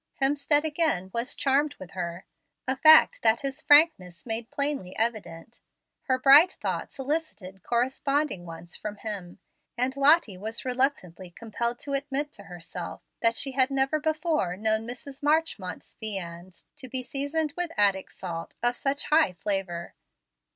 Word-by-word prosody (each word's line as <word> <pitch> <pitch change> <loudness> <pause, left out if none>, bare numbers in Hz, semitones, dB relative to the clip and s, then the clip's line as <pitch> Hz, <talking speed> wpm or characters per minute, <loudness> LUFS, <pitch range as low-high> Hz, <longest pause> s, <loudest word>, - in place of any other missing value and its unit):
Hemstead 290 +2 +2
again 300 - 0
was 235 +2 -2
charmed 285 +2 +1
with 185 - -11
her, 175 -1 -5 0.4
a 265 - +1
fact 315 +3 +7
that 225 0 +3
his 275 +2 -4
frankness 290 - +4
made 225 0 -4
plainly 280 -10 -3
evident. 215 -4 -3 0.4
Her 260 -1 +1
bright 285 +7 +7
thoughts - - -4
elicited 260 - -4
corresponding 265 - -1
ones 165 +1 -8
from 210 -1 -6
him, 200 -5 -6 0.4
and 255 +2 0
Lottie 275 - +3
was 220 +5 -4
reluctantly 245 - -1
compelled 235 +5 -3
to 285 - -6
admit 285 +1 -2
to 200 - -12
herself 175 -1 -8 0.2
that 230 0 +4
she 270 - 0
had 260 0 +3
never 270 +2 +1
before 310 - -1
known 220 +1 0
Mrs. 270 +3 -8
Marchmont's 295 - -1
viands 185 -4 -6
to 260 - -7
be 255 +1 -1
seasoned 285 +3 -2
with 355 -1 -1
Attic 200 -2 +2
salt 165 -3 -7
of 240 0 +2
such 275 +2 -1
high 305 - +3
flavor. 180 -1 -3
245 Hz, 145 wpm, -27 LUFS, 190-285 Hz, 0.4 s, fact